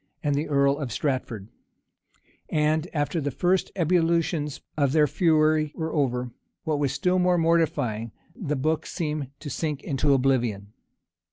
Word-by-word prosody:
and 145 -2 +1
the 145 +3 -1
earl 140 0 +2
of 135 -5 -4
Stratford; 120 -6 -2 1.0
and 155 +1 +1
after 155 +2 -1
the 145 - -1
first 180 +7 0
ebullitions 165 -3 +1 0.2
of 140 -3 +1
their 155 -1 +5
fury 155 0 +2
were 160 -1 -3
over, 125 -4 0 0.3
what 155 -2 -1
was 140 -3 +1
still 180 +6 +1
more 180 0 +3
mortifying, 155 -10 +1 0.2
the 170 - -3
book 155 +4 -1
seemed 150 -4 -3
to 150 - -9
sink 150 -2 -3
into 140 +1 +1
oblivion. 120 -6 0
150 Hz, 145 wpm, -25 LUFS, 135-160 Hz, 1.0 s, their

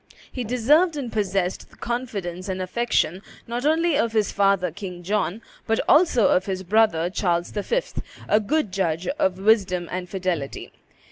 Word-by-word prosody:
He 250 - -4
deserved 295 +9 +3
and 255 -5 -4
possessed 195 -3 -1
the - - -20
confidence 200 -7 -4
and 190 0 -2
affection 185 -3 0 0.2
not 240 +4 -2
only 325 +1 +2
of 230 -4 0
his 215 -2 +1
father, 195 -3 +2
King 180 -1 -8
John, 205 +2 -1 0.2
but 225 0 +1
also 295 - +5
of 185 - +2
his 190 -1 -3
brother, 190 -4 +3
Charles 175 -3 0
V., 475 - 0 0.5
a 210 - +4
good 245 +1 0
judge 180 -3 -1
of 190 -11 0
wisdom 190 -4 +2
and 180 0 -4
fidelity. 180 -7 -3
200 Hz, 155 wpm, -24 LUFS, 185-235 Hz, 0.5 s, also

